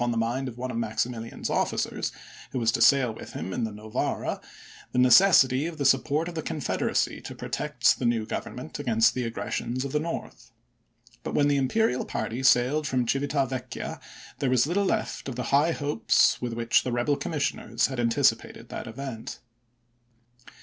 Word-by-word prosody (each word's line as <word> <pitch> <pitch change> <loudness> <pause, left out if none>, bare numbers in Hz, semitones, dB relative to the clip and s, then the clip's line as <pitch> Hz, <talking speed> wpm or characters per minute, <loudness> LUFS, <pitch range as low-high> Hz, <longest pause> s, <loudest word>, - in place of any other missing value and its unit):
the 115 - -1
mind 120 +4 -1
of 120 -2 -7
one 130 +1 -4
of - - -4
Maximilian's 115 +1 -3
officers, - - -1 0.4
who 135 - -3
was 115 -2 +2
to - - -1
sail 135 -5 +5
with - - -10
him 95 - -5
in 120 - -1
the 110 - -5
Novara, 105 +1 -3 0.5
the - - -2
necessity 130 +1 +6
of 170 -2 -7
the 140 - -2
support 140 +4 +2
of 175 - -6
the 160 - -3
Confederacy 155 -2 -1
to - - -8
protect - - 0
the 125 - -2
new 115 -2 +1
Grovernment 80 - -6
against 115 -5 +3
the 125 -1 -2
aggressions 120 +2 -3
of 140 - -4
the 150 - +1
North. 150 - -6 0.7
But - - -5
when 145 - +4
the 145 - +2
imperial 135 - +1
party 120 +3 -3
sailed 130 +3 +3
from 125 -2 0
Civita 140 +2 +1
Vecchia 130 -1 -5 0.4
there 135 - 0
was 125 -1 +3
little 190 +6 0
left 215 -8 -2
of 130 - -6
the 125 - -3
high 150 +4 +4
hopes 145 -5 +2
with 120 -2 -3
which 115 0 +2
the 125 - -3
Rebel 120 +4 +1
Commissioners 140 -7 -1
had 130 -1 -3
anticipated 115 -1 +1
that - - -6
event. 115 0 -6
130 Hz, 175 wpm, -26 LUFS, 115-145 Hz, 0.7 s, necessity